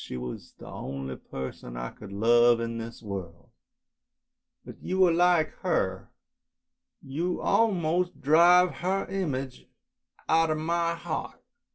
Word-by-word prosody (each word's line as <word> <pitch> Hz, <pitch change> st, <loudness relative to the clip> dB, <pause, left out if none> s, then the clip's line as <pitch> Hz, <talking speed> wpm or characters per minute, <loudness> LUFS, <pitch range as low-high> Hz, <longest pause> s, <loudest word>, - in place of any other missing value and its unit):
She -, -, -6 dB
was 60 Hz, 0 st, -7 dB
the -, -, -12 dB
only 65 Hz, -1 st, -6 dB
person 65 Hz, -2 st, -8 dB
I -, -, -5 dB
could 105 Hz, -2 st, -12 dB
love 120 Hz, +3 st, +4 dB
in 115 Hz, 0 st, -3 dB
this 115 Hz, +1 st, -8 dB
world, 95 Hz, -5 st, -7 dB, 1.1 s
but -, -, -11 dB
you 185 Hz, 0 st, +2 dB
are 175 Hz, -, +4 dB
like 175 Hz, -1 st, +3 dB
her, 95 Hz, -, -1 dB, 0.9 s
you 165 Hz, +7 st, -2 dB
almost 180 Hz, -5 st, +1 dB
drive 175 Hz, +4 st, +5 dB
her 190 Hz, +2 st, -1 dB
image 140 Hz, -9 st, -4 dB, 0.6 s
out 165 Hz, 0 st, +3 dB
of 155 Hz, -, 0 dB
my 170 Hz, +1 st, 0 dB
heart. 170 Hz, -, -5 dB
155 Hz, 130 wpm, -27 LUFS, -, 1.1 s, drive